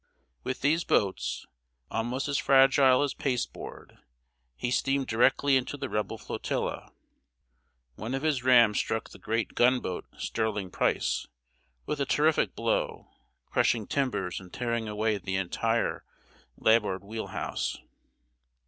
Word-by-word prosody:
With 130 - -3
these 160 +5 +2
boats, 100 - 0 0.5
almost 120 +5 -2
as 140 -1 0
fragile 135 0 +5
as 145 - -1
pasteboard, 125 -4 -4 0.6
he 120 - -3
steamed 135 +2 +1
directly 130 +4 +3
into 130 +2 0
the - - -4
Rebel 105 0 -2
flotilla. - - -4 1.1
One 115 +5 -3
of 135 - -3
his 145 -5 +1
rams 120 -5 +6
struck 110 0 -2
the - - -13
great 115 0 -2
gunboat 125 -7 +1
Sterling 105 -4 -2
Price - - 0 0.6
with 150 -1 -2
a 140 - 0
terrific 155 +1 +2
blow, - - -1 0.3
crushing 115 -3 +1
timbers 120 -11 -1
and 90 -2 -13
tearing 115 -2 -2
away 105 0 0
the 95 0 -3
entire 115 +5 0 0.5
larboard 105 -4 +2
wheel 110 +2 -5
house. - - -3
120 Hz, 125 wpm, -28 LUFS, 105-135 Hz, 1.1 s, rams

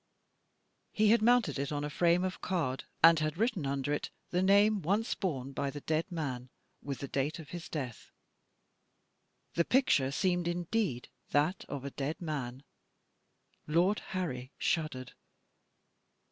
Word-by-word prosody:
He 215 0 +3
had 230 -1 +5
mounted 230 - +3
it 140 +1 -2
on 145 -1 -2
a 150 - -2
frame 175 +3 +3
of 185 -1 -3
card, 150 -8 -1 0.2
and 165 -1 +8
had 155 +1 -1
written 215 - 0
under 140 +1 -1
it 145 - -2 0.2
the 180 - +2
name 200 +2 +5
once 200 +8 +1
borne 135 -9 -3
by 140 +1 -2
the 145 +1 -7
dead 160 +5 -1
man, 130 -7 -4 0.3
with 140 -1 -4
the 140 - -3
date 140 +3 -1
of 160 -5 -10
his 175 -1 -7
death. 130 -7 -5 1.4
The 170 - +3
picture 210 - +3
seemed 175 +3 0
indeed 175 - -1 0.2
that 150 +6 +1
of 140 -1 -5
a 140 - -4
dead 140 +4 -3
man. 140 -6 -4 1.0
Lord 175 +7 +3
Harry 135 -9 -4
shuddered. 155 -7 -1
155 Hz, 145 wpm, -32 LUFS, 140-185 Hz, 1.4 s, and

